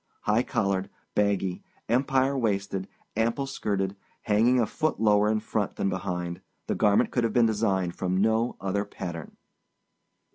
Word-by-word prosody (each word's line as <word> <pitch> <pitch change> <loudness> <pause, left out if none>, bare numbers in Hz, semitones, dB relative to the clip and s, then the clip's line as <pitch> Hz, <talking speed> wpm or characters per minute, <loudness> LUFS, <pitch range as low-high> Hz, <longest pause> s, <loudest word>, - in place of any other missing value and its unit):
High 105 +3 +2
collared, 100 -5 -1 0.2
baggy, 100 -3 +1 0.3
empire 130 +3 +2
waisted, 100 -5 -1 0.3
ample 115 +5 +1
skirted, 100 -7 -2 0.3
hanging 115 +4 +3
a 115 - +3
foot 155 +7 -1
lower 105 -1 +4
in 110 0 +2
front 105 -2 -2
than 100 - 0
behind, 90 -2 -3 0.2
the - - -1
garment 105 -2 +3
could 120 - +1
have 115 -2 0
been 120 -2 +5
designed 100 -5 0
from 95 0 -1
no 110 +4 +2
other 100 +1 -1
pattern. 85 -5 -7
105 Hz, 145 wpm, -27 LUFS, 95-115 Hz, 0.3 s, been